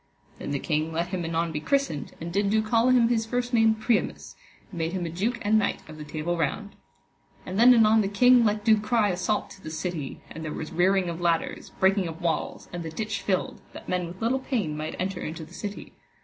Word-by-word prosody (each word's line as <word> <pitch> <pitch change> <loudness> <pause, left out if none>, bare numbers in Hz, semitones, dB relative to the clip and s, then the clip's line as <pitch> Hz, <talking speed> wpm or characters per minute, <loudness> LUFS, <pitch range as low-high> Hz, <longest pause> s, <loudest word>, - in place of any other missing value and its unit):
Then - - -5
the 140 - 0
king 155 +2 -1
let 170 +2 -2
him 180 -2 -3
anon 165 0 -1
be 150 - -3
christened, 160 - -1
and 170 +1 -6
did 200 +1 +1
do 215 +1 +2
call 230 +3 +3
him 245 -2 +5
his 225 -2 +1
first 245 +1 -2
name 225 -1 +4
Priamus, 220 +1 -1 0.4
and 175 - -7
made 165 +2 -1
him 180 -2 -2
a 165 - -4
duke 215 +8 -1
and 215 +1 +4
knight 205 - -2
of 155 0 -11
the - - -6
Table 155 +3 -3
Round. 200 +6 -2 0.7
And 185 +3 -3
then 245 +2 +8
anon 220 -2 +6
the 200 - 0
king 245 +4 +5
let 210 -1 0
do 220 -1 +5
cry 215 0 +2
assault 185 +3 -1
to 195 - -13
the 155 - -7
city, 160 -3 -4
and 160 - -7
there 155 - -4
was 155 - -6
rearing 185 +2 +2
of 170 0 -4
ladders, 170 -1 0
breaking 190 -1 +3
of 165 0 -7
walls, 170 -3 -2
and 175 - -4
the 165 - -5
ditch 210 +4 -3
filled, 185 -2 -1
that - - -10
men 180 -1 -1
with 180 +5 -8
little 250 +4 +2
pain 220 - -2
might 155 +1 -4
enter 185 0 -2
into 160 +1 -5
the 165 - -17
city. 205 +2 -7
190 Hz, 235 wpm, -26 LUFS, 165-220 Hz, 0.7 s, then